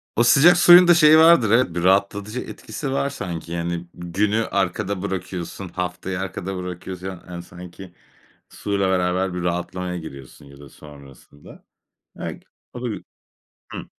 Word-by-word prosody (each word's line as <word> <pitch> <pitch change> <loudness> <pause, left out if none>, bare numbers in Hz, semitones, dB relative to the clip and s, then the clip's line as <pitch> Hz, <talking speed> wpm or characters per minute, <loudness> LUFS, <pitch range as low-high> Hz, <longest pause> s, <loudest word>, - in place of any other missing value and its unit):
O 120 - +3
sıcak 155 +9 +6
suyun 175 0 +8
da 175 - +7
şeyi 155 -2 +6
vardır 160 -9 +5
evet, 115 -7 +2
bir 85 - -2
rahatlatıcı 100 +4 +1
etkisi 125 +3 -7
var 140 +1 -1
sanki. 85 - -7
Yani, 85 0 -3
günü 100 +6 -1
arkada 100 0 -2
bırakıyorsun, 95 -1 -5
haftayı 90 +1 -4
arkada 95 0 -5
bırakıyorsun. 90 +1 -7
Yani, 95 -2 -8
hani, 85 -1 -8
sanki 90 +1 -12 0.6
suyla 100 -2 -2
beraber 90 0 0
bir 90 -1 -4
rahatlamaya 90 +1 -3
giriyorsun 70 -5 -11
ya 70 0 -16
da 70 -1 -13
sonrasında. 70 0 -16 0.6
Eg - - -6 0.3
o 125 - -8
da 125 - -2
gü 110 - -6 0.7
Hıı. - - -7
95 Hz, 150 wpm, -22 LUFS, 85-105 Hz, 0.7 s, suyun